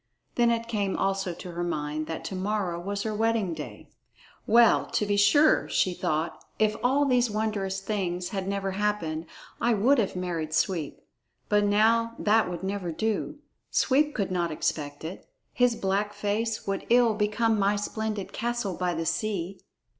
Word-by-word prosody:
Then 240 -1 +3
it 230 0 0
came 205 -4 -1
also 195 -1 0
to 175 +1 -8
her 175 +1 -3
mind 155 -2 -3
that 160 - -5
to 190 - -4
morrow 185 -2 -1
was 200 +3 -3
her 220 - -2
wedding 220 -4 +1
day. - - -8 0.6
"Well, 235 0 +5
to 210 - 0
be 205 0 +1
sure," 215 +10 +4
thought 170 -3 -1
she, 220 - +4
"if 215 - -1
all 275 +4 +3
these 250 -3 +3
wondrous 205 -3 -2
things 180 -3 -2
had 195 -3 -3
never 195 -1 -1
happened, 190 -6 -2 0.3
I 235 -1 +3
would 250 +7 +4
have 200 -4 0
married 170 -4 -3
Sweep. 160 -2 -1 0.5
But 210 0 +3
now 225 +3 +3
that 215 -1 +3
would 175 0 -5
never 190 -3 -2
do. 220 - -2 0.3
Sweep 295 +3 +2
could 200 -4 -1
not 175 -2 0
expect 145 -1 -3
it. 175 - -8 0.2
His 245 -1 +3
black 200 +1 -1
face 210 +2 -2
would 195 -1 -3
ill 240 -2 +5
become 215 +1 +1
my 200 +1 +3
splendid 210 0 -3
castle 240 -4 -2
by 180 -1 -1
the 165 0 -2
sea." 195 -2 -2
205 Hz, 170 wpm, -27 LUFS, 180-220 Hz, 0.6 s, Well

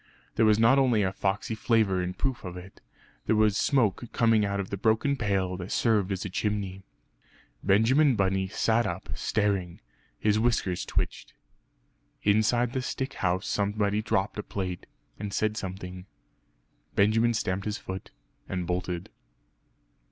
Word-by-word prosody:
There 110 - +3
was 105 -1 +5
not 115 +5 +5
only 120 -6 +3
a 95 0 0
foxey 100 +3 -1
flavour 110 -3 +2
in 90 0 -3
proof 130 +5 -2
of 90 -2 -6
it 90 +2 -12 0.5
there 110 - +3
was 105 -1 +3
smoke 120 -3 +1
coming 115 -2 +3
out 100 0 -1
of 95 - -4
the - - -1
broken 110 +7 +2
pail 95 -6 0
that 90 +1 -7
served 105 -4 +2
as 95 0 -3
a - - -3
chimney. 100 -1 -2 0.8
Benjamin 125 +8 +4
Bunny 95 -1 +1
sat 110 +3 +1
up, 90 0 -5
staring; 100 -5 -1 0.4
his 105 0 +2
whiskers 110 -6 0
twitched. - - -3 0.9
Inside 110 +4 +2
the 130 - -1
stick 130 +1 -3
house 95 -1 -1
somebody 105 +1 0
dropped 105 -1 -1
a - - -3
plate, 90 -3 -5 0.3
and 105 -1 -4
said 110 +1 0
something. 95 -2 -6 0.9
Benjamin 115 +3 +3
stamped 95 -2 -1
his 105 - -2
foot, 95 0 -7 0.4
and 90 -2 -2
bolted. 90 0 -3
105 Hz, 150 wpm, -28 LUFS, 95-110 Hz, 0.9 s, was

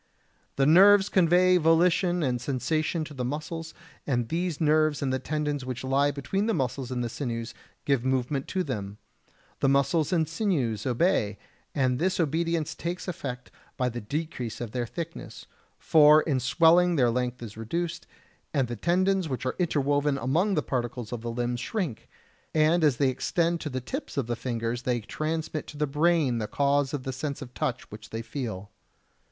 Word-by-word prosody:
The 135 - +2
nerves 195 +5 +7
convey 180 0 +4
volition 175 +1 +3
and 125 -3 0
sensation 155 +5 -1
to 155 - -10
the 130 -3 -4
muscles, 160 +5 -5 0.3
and 120 -5 0
these 175 -2 -2
nerves 155 -2 +2
and 130 -1 0
the 130 - 0
tendons 150 0 -2
which 130 -1 -5
lie 135 +2 +2
between 170 - -2
the 225 - +1
muscles 130 -2 -2
and 125 -1 -2
the - - -1
sinews 115 -2 -4 0.3
give 135 -4 +1
movement 130 +1 -1
to 185 - -1
them; 105 - -5 0.6
the 135 - +3
muscles 140 +3 +2
and 165 -3 +2
sinews 145 - -1
obey, 125 - +1 0.4
and 130 -3 +1
this 185 +2 0
obedience 165 0 0
takes 175 +3 -5
effect 125 -8 -5 0.3
by 125 -1 +1
the 120 0 -6
decrease 125 -1 -4
of 120 -3 -5
their 120 -1 -2
thickness, 170 +5 -7 0.3
for 155 -1 +6
in 140 -5 0
swelling 170 +6 +4
their 125 -5 +3
length 125 0 -2
is 110 -2 -8
reduced, 165 +9 -4 0.5
and 135 -3 +2
the 120 - -4
tendons 185 +3 +1
which 130 -1 -4
are 130 - -1
interwoven 145 -4 +1
among 165 - +1
the 150 - +1
particles 120 -2 -3
of 120 - -4
the 120 - -4
limbs 120 +1 -2
shrink, 175 - -4 0.5
and 160 +2 +3
as 145 -5 +3
they 140 -2 +3
extend 170 +6 0
to 150 - -4
the 130 -1 -3
tips 265 - -6
of 135 - +1
the 120 +1 -2
fingers 115 -1 -3
they 125 -1 0
transmit 155 +7 -3
to 150 - -10
the 150 - +1
brain 150 -3 +2
the 105 - -2
cause 140 +1 +1
of 145 -3 -4
the 130 - -4
sense 140 +2 -4
of 125 -1 -12
touch - - -3
which - - -10
they 115 +1 -5
feel. 110 -5 -5
145 Hz, 180 wpm, -27 LUFS, 125-165 Hz, 0.6 s, nerves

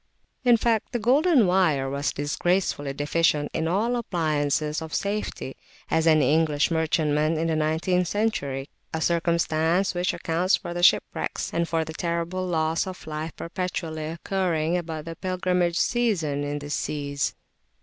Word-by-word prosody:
In 240 -2 +6
fact 225 +1 0
the 240 - 0
"Golden 270 - +4
Wire" 175 -7 +2
was 140 +1 -2
as - - +1
disgracefully 145 0 0
deficient 145 +1 +1
in 160 - -1
all 205 +8 +1
the 245 - 0
appliances 155 -6 0
of 160 0 -5
safety, 200 -9 -3 0.4
as 160 0 +2
any 150 -3 +4
English 155 -1 +2
merchantman 155 -1 +1
in 160 - 0
the 160 - +1
nineteenth 160 +4 +1
century, 145 -11 -1 0.3
a - - -1
circumstance 170 +2 +1
which 180 0 0
accounts 175 +4 +1
for 175 - -6
the 175 - -3
shipwrecks 175 - +2
and 170 0 0
for 160 -1 0
the 160 - -7
terrible 170 +2 -2
loss 160 0 0
of 185 0 -8
life 155 +1 -5
perpetually 170 -3 -4
occurring 170 -1 -1
about 160 -3 -4
the 165 0 -6
Pilgrimage 180 -2 0
season 175 -13 +1
in 145 0 -2
these 145 0 -5
seas. 140 -2 -2
165 Hz, 155 wpm, -25 LUFS, 155-185 Hz, 0.4 s, In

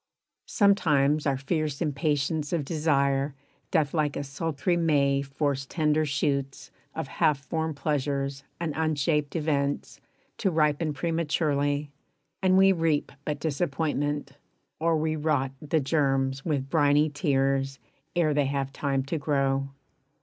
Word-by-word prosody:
Sometimes 150 -8 +3
our 135 -1 +1
fierce 150 +1 -2
impatience 150 0 -1
of 160 -5 0
desire 140 -3 +1 0.3
Doth 155 -6 +1
like 150 -3 0
a - - -2
sultry 160 +4 -1
May 140 -5 +2
force 140 0 -2
tender 155 -1 +1
shoots 140 -1 -2 0.2
Of - - -3
half 150 -2 +2
formed 160 +3 -3
pleasures 140 -1 -2 0.2
and 165 -3 -2
unshaped 150 -1 0
events 145 -3 -1 0.4
To 195 - +2
ripen 155 -2 +1
prematurely, 150 -2 0 0.5
and 185 -1 +4
we 195 0 +6
reap 165 -4 +1
But 150 -1 -2
disappointment; 145 -2 -1 0.5
or 165 0 +2
we 155 0 0
rot 145 -4 0
the 155 +1 +1
germs 135 -2 0
With 140 -4 -2
briny 150 -1 +4
tears 135 -2 0 0.4
ere 160 -3 +2
they 145 -2 +2
have 135 -1 -2
time 135 -2 -1
to 155 +4 -3
grow. 135 -2 0
145 Hz, 130 wpm, -27 LUFS, 140-155 Hz, 0.5 s, we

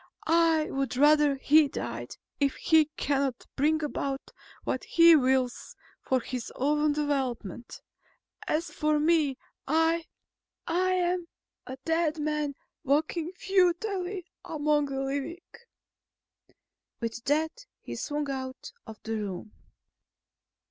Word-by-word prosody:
I 325 -1 +4
would 270 -2 -2
rather 295 0 +5
he 295 +2 +5
died, 120 - -6 0.2
if 280 -2 +1
he 320 -1 +4
cannot 275 -3 -1
bring 310 +3 +2
about 275 -2 -3 0.3
what - - -2
he 335 0 +7
wills 260 -3 +1 0.3
for 260 - +1
his 250 0 -5
own 295 +2 +2
development. 265 - -3 0.6
As 325 +3 -1
for 305 -1 +1
me, 305 -4 +2 0.3
I... 325 +2 +2 0.6
I 370 +2 +1
am 355 -1 0 0.4
a 260 - -6
dead 325 -1 +1
man 300 -1 -1 0.3
walking 310 +4 0
futilely 370 0 0 0.2
among 300 -1 +1
the 270 -1 -3
living." 280 +5 -3 1.6
With 230 0 -4
that, 315 - 0
he - - -7
swung 295 -1 -3
out 260 -1 -6 0.2
of 220 -1 -9
the 225 0 -2
room. 205 0 -5
295 Hz, 115 wpm, -28 LUFS, 270-325 Hz, 1.6 s, he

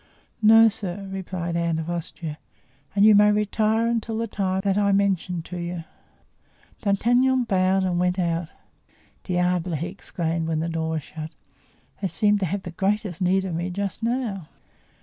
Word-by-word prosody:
"No, 225 +1 +8
sir," 195 -2 -4
replied 180 -3 -4
Anne 170 -1 0
of 160 0 -4
Austria, 165 -2 -5 0.6
"and 200 +1 +5
you 215 - +8
may 210 0 +6
retire 215 +2 +1
until 230 -1 -1
the 230 - -1
time 190 -3 -1
that 195 -2 +1
I 200 0 +2
mentioned 190 -4 0
to 180 - -7
you." 175 -1 -4 1.0
D'Artagnan 245 +5 +3
bowed 190 -3 +2
and 180 -2 0
went 180 +1 +1
out. 170 -2 -1 0.7
"Diable!" 180 -1 0
he 155 - -2
exclaimed 165 -3 -3
when 160 -1 0
the 165 +1 -2
door 160 -1 -2
was 160 -2 -2
shut, 160 0 -8 0.7
"they 195 - +1
seem 210 +1 +2
to 190 - 0
have 195 +3 -3
the 175 - -6
greatest 195 0 -1
need 190 +1 +2
of 185 - -3
me 170 +2 -2
just 200 +3 -3
now." 225 -7 -2
190 Hz, 170 wpm, -24 LUFS, 170-210 Hz, 1.0 s, No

